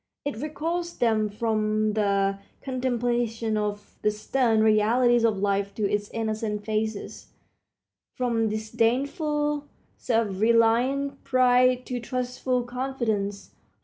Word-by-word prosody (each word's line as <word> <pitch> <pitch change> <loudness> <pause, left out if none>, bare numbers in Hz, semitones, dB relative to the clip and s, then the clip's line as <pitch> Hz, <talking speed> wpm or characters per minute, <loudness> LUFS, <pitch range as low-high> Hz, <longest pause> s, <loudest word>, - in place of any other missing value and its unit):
It 285 -5 -3
recalls 330 +5 -3
them 220 -3 +2
from 215 0 0
the 200 -2 +1 0.2
contemplation 240 -3 -1
of 205 -1 -4
the 210 - +3
stern 220 +1 +1
realities 230 +3 +4
of 220 -3 +2
life 200 0 0
to 210 -2 0
its 205 0 -1
innocent 215 -2 -3
phases, 215 -1 -3 0.9
from 230 -3 0
disdainful, 285 - 0 0.3
self 225 -5 0
reliant 240 +5 +2
pride 255 -1 +3
to 250 -1 -3
trustful 250 +1 -2
confidence. 240 -5 -3
230 Hz, 105 wpm, -26 LUFS, 215-255 Hz, 0.9 s, realities